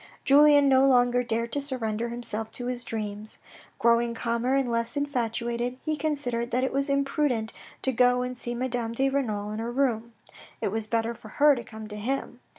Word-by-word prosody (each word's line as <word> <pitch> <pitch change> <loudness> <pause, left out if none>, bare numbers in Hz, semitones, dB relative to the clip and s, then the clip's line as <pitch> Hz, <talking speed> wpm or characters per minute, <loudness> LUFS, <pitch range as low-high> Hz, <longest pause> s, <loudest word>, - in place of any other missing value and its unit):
Julien 290 0 +6
no 265 -1 +5
longer 245 -1 +4
dared 230 -1 -2
to 285 - -1
surrender 235 -4 -2
himself 225 -2 -4
to 245 - -6
his 250 0 -3
dreams. 215 -1 -5 0.4
Growing 235 0 +3
calmer 235 +3 0
and 270 -2 +1
less 230 +2 -2
infatuated, 240 -3 -2
he 310 - 0
considered 275 -6 -2
that 250 +2 0
it 265 - -1
was 275 +1 0
imprudent 275 -5 0 0.3
to 265 - +1
go 250 0 +3
and 250 0 -4
see 240 0 -5
Madame 240 -2 -2
de 270 +3 +1
Renal 215 -7 -1
in 215 - -4
her 230 +1 -3
room. 235 -3 0 0.5
It - - -1
was 220 +1 -3
better 230 +1 0
for 220 - -13
her 295 +5 +5
to 240 -3 -4
come 220 -1 -9
to 210 0 -7
him. 245 +2 -3
240 Hz, 190 wpm, -27 LUFS, 230-265 Hz, 0.5 s, Julien